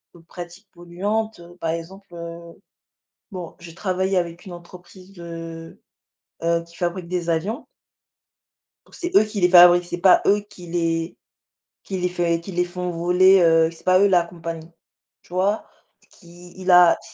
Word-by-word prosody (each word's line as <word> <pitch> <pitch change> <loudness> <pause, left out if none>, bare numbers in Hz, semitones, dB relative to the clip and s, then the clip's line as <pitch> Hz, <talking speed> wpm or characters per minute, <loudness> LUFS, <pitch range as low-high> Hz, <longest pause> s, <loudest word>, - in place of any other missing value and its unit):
de 170 - -15
pratiques 175 +3 -11
polluantes, 200 +5 -3 0.2
par 165 - -2
exemple, 190 +4 -7
heu, 170 0 -9 0.8
bon, 180 -4 -8
j'ai 170 -1 -12
travaillé 190 0 -1
avec 170 +2 -3
une 185 - -9
entreprise 180 +2 -14
de, 165 -2 -9 0.6
heu, 170 0 +1
qui 170 - -18
fabrique 175 0 -3
des 175 -1 -3
avions. 175 +8 -2 1.2
Donc - - -17
c'est 350 0 -5
eux - - +7
qui 210 -2 -5
les 180 - +4
fabriquent. 175 0 +8
C'est 175 - -5
pas 190 -1 +6
eux 205 +1 +3
qui 180 -3 -13
les 165 -1 -2 0.7
qui 190 -1 -5
les 180 0 0
fait 170 -2 -1
qui 190 +3 -9
les 180 0 +1
font 180 0 -5
voler, 180 +3 +4
heu, 165 -1 +4
c'est 165 - -16
pas 185 0 +4
eux 200 - +5
la 180 -2 +4
compagnie, 165 -1 -8 0.5
tu - - -22
vois? 195 +4 0 0.5
Qui 175 0 -16
il 185 0 -1
a 175 -1 +7
175 Hz, 165 wpm, -22 LUFS, 170-185 Hz, 1.2 s, fabriquent